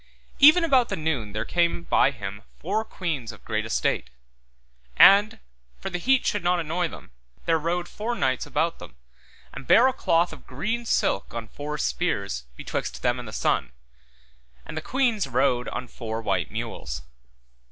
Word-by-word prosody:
Even 310 +4 +8
about 265 -7 +3
the - - -1
noon 145 -10 -2
there 110 +1 -3
came 170 0 +1
by 135 - +3
him 100 -6 -7 0.2
four 205 +6 -1
queens 155 - -4
of 110 - -16
great 110 0 -2
estate; 60 - 0 0.9
and, 205 +2 +7 0.4
for 195 - -5
the 180 - -2
heat 265 +6 +2
should 205 -3 0
not 175 0 +2
annoy 170 +2 -1
them, 155 - -12 0.3
there 165 -1 +2
rode 175 +2 -1
four 230 +3 -4
knights 130 - 0
about 165 +3 -1
them, - - -11 0.6
and 135 - -9
bare 245 +3 +7
a 265 - +1
cloth 170 -4 +1
of - - -14
green 220 - -3
silk 100 - 0
on 115 -1 -5
four 150 +5 -6
spears, 100 - -1
betwixt - - -5
them 125 0 +1
and 120 - -8
the - - -7
sun, - - 0 0.9
and 155 - -8
the 155 - -3
queens 240 - 0
rode 125 0 +1
on 125 - -5
four 115 -2 -5
white 95 -6 -1
mules. 70 +5 -5
160 Hz, 170 wpm, -25 LUFS, 115-195 Hz, 0.9 s, Even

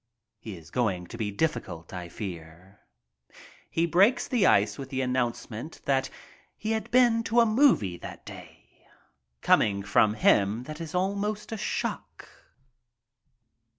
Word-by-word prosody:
He 105 -3 -8
is 80 0 -15
going 100 -8 -1
to 90 - -10
be 105 -2 -1
difficult, 100 - -3
I 90 -1 -6
fear. 90 +1 -9 0.9
He 165 - +1
breaks 195 +9 +3
the 235 -7 +2
ice 105 +1 +3
with 135 -1 -7
the 130 -1 -2
announcement 125 +1 -3
that 135 -1 +1 0.5
he 215 - -3
had 220 0 -2
been 240 -2 +4
to 230 +3 +2
a 235 - +6
movie 215 - +3
that - - -10
day! - - -14 0.6
Coming 100 -1 +3
from 105 +1 +3
him 105 +2 +2
it 155 0 -7
was 165 0 -6
almost 200 +4 -2
a 225 - -3
shock. - - -4
125 Hz, 140 wpm, -27 LUFS, -, 0.9 s, a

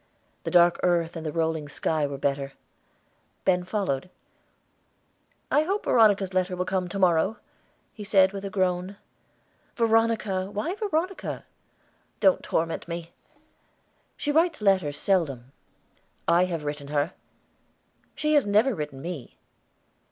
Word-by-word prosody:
The - - -1
dark 175 0 +5
earth 170 -2 +1
and 165 - -5
the 155 - -3
rolling 160 -2 -1
sky 155 +1 0
were 140 -1 -5
better. 140 0 -2 0.9
Ben 180 -1 +3
followed. 180 -6 -2 1.4
"I 295 - +5
hope 390 +6 -1
Veronica's 205 -5 +4
letter 185 0 0
will 180 0 -2
come 185 -1 -1
to 175 - -5
morrow," 185 +3 +3 0.6
he 210 - -8
said 195 -1 +4
with 195 0 -6
a 200 - -3
groan. 185 0 -1 0.8
"Veronica! 225 -4 +1
Why 210 - -2
Veronica?" 385 -3 -3 0.7
"Don't 190 -3 +4
torment 165 0 -2
me." 170 0 -6 1.0
"She 290 - -1
writes 325 +1 +2
letters 185 -8 +2
seldom." 140 -10 0 0.8
"I 170 +2 +5
have 170 -4 -4
written 145 -1 -5
her." 145 +3 0 1.0
"She 305 0 0
has 290 -8 +4
never 215 +6 +3
written 150 -6 -6
me." 170 -7 -7
185 Hz, 130 wpm, -26 LUFS, 160-210 Hz, 1.4 s, dark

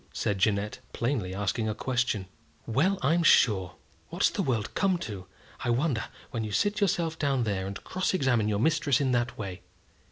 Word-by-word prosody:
said 100 -2 -1
Jeannette, 105 +1 +1
plainly 115 -7 -1
asking 105 +3 -1
a 105 - -2
question. 120 -4 -1 0.4
"Well, 155 - +2
I'm 165 +6 +3
sure! 95 - +4 0.3
What's - - +2
the - - -1
world 115 -6 -1
come 190 -2 +2
to, 100 - -7 0.4
I 120 - -1
wonder, 125 -1 +1 0.3
when 115 - -2
you 105 - -4
sit 205 - +1
yourself 165 -4 +1
down 135 -4 +1
there, 95 -3 -1
and 100 0 -7
cross 185 0 -1
examine 125 - +2
your 105 -1 +1
mistress 150 +2 +2
in 135 -2 +1
that 120 -1 0
way! 95 -3 -6
120 Hz, 180 wpm, -28 LUFS, 105-145 Hz, 0.4 s, sure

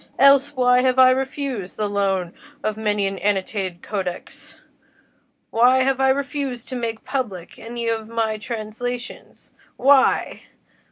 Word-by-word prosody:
Else, 275 +1 +5
why 250 -1 +4
have 255 0 +1
I 255 0 +7
refused 265 -6 -3
the 210 - -1
loan 195 -3 -1 0.3
of 215 - -1
many 210 -2 0
an 195 0 -3
annotated 190 -3 -2
codex? 185 -4 -6 0.9
why 250 +3 +4
have 270 0 +1
I 265 - +4
refused 275 -3 -2
to 260 - -4
make 230 -2 -4
public 235 -10 -4
any 235 0 -5
of 225 -1 -2
my 225 -1 -1
translations? 235 +2 -6 0.2
why? 270 +1 +3
235 Hz, 130 wpm, -22 LUFS, 210-260 Hz, 0.9 s, I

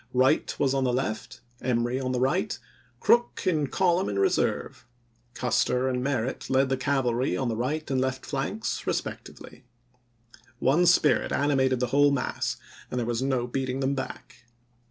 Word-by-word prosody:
Wright 130 +1 +3
was 135 -1 +2
on 135 -1 +1
the 125 - +1
left, 125 0 -3 0.2
Emory 120 0 0
on 130 -1 -2
the 125 - -1
right, 130 +1 0 0.4
Crook 240 0 +2
in 155 -6 +1
col 180 +3 +2
umn - - -2
in 100 - -3
reserve; 100 +4 0 0.5
Custer 125 +1 +1
and 125 -1 -1
Merritt 130 -2 -2
led 130 0 +3
the 135 - +2
cavalry 130 -2 0
on 130 -3 -1
the 115 - -1
right 145 +7 -2
and 130 -1 +1
left 130 0 -2
flanks - - -3
respectively. - - -5 0.9
One 160 +7 +3
spirit 170 -3 +4
animated 130 -3 +2
the 125 - +1
whole 145 +1 +6
mass, 140 -2 -1 0.3
and - - -4
there 120 - -1
was 120 +1 -1
no 130 -2 0
beating 130 +1 -2
them 135 +1 0
back. 130 -2 -7
130 Hz, 165 wpm, -27 LUFS, 125-140 Hz, 0.9 s, whole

